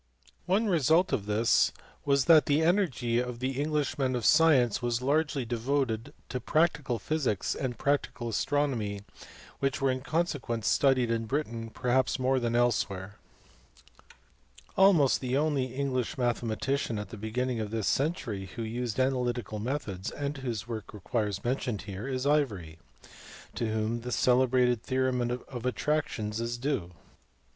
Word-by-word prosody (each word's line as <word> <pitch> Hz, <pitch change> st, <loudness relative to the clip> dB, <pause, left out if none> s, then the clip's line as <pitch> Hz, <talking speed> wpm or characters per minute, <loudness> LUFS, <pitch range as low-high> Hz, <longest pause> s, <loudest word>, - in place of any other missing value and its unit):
One 195 Hz, +5 st, +2 dB
result 165 Hz, -1 st, +3 dB
of 105 Hz, -6 st, -1 dB
this 110 Hz, +2 st, +3 dB, 0.3 s
was 140 Hz, -2 st, +3 dB
that 160 Hz, -3 st, +6 dB
the 150 Hz, +2 st, +3 dB
energy 160 Hz, -, +1 dB
of 125 Hz, 0 st, -4 dB
English 145 Hz, +2 st, -1 dB
men 130 Hz, -2 st, +1 dB
of 120 Hz, -, -2 dB
science 145 Hz, -8 st, +5 dB
was 120 Hz, -1 st, 0 dB
largely 145 Hz, 0 st, 0 dB
devoted 120 Hz, -1 st, -1 dB, 0.2 s
to 125 Hz, -, -3 dB
practical 155 Hz, -5 st, +1 dB
physics 135 Hz, -, -1 dB
and 125 Hz, -4 st, -3 dB
practical 140 Hz, -3 st, -1 dB
astronomy, 115 Hz, -4 st, -1 dB, 0.6 s
which 135 Hz, -1 st, 0 dB
were 135 Hz, -1 st, +2 dB
in 130 Hz, 0 st, -3 dB
consequence 140 Hz, -, -2 dB
studied 130 Hz, -4 st, +3 dB
in 115 Hz, -1 st, -1 dB
Britain 115 Hz, -4 st, -3 dB
perhaps 125 Hz, +3 st, +1 dB
more 130 Hz, 0 st, +1 dB
than 120 Hz, -1 st, -1 dB
elsewhere. 100 Hz, -5 st, 0 dB, 1.5 s
Ivory. -, -, -30 dB
Almost 185 Hz, -8 st, +5 dB
the 130 Hz, 0 st, 0 dB
only 145 Hz, -3 st, +1 dB
English 130 Hz, -1 st, -2 dB
mathematician 120 Hz, 0 st, -1 dB
at 105 Hz, -2 st, -5 dB
the -, -, -8 dB
beginning 120 Hz, +3 st, -2 dB
of 110 Hz, -1 st, -3 dB
this 110 Hz, -1 st, -2 dB
century 130 Hz, -, -1 dB
who 115 Hz, -, -3 dB
used 120 Hz, +1 st, -3 dB
analytical 125 Hz, -4 st, 0 dB
methods 105 Hz, -6 st, -3 dB
and 145 Hz, 0 st, -4 dB
whose 120 Hz, -6 st, -4 dB
work 110 Hz, -2 st, -6 dB
requires 105 Hz, -1 st, -2 dB
mention 125 Hz, -2 st, -1 dB
here 100 Hz, +4 st, -7 dB
is 130 Hz, -1 st, -2 dB
Ivory, 105 Hz, -, 0 dB, 0.7 s
to 115 Hz, -2 st, -2 dB
whom 110 Hz, +2 st, -1 dB
the 125 Hz, +1 st, -5 dB
celebrated 125 Hz, -1 st, +3 dB
theorem 130 Hz, 0 st, 0 dB
in 120 Hz, +1 st, -1 dB, 0.2 s
attractions 125 Hz, -5 st, -1 dB
is 120 Hz, +1 st, -2 dB
due. 120 Hz, -10 st, -2 dB
125 Hz, 145 wpm, -29 LUFS, 115-140 Hz, 1.5 s, that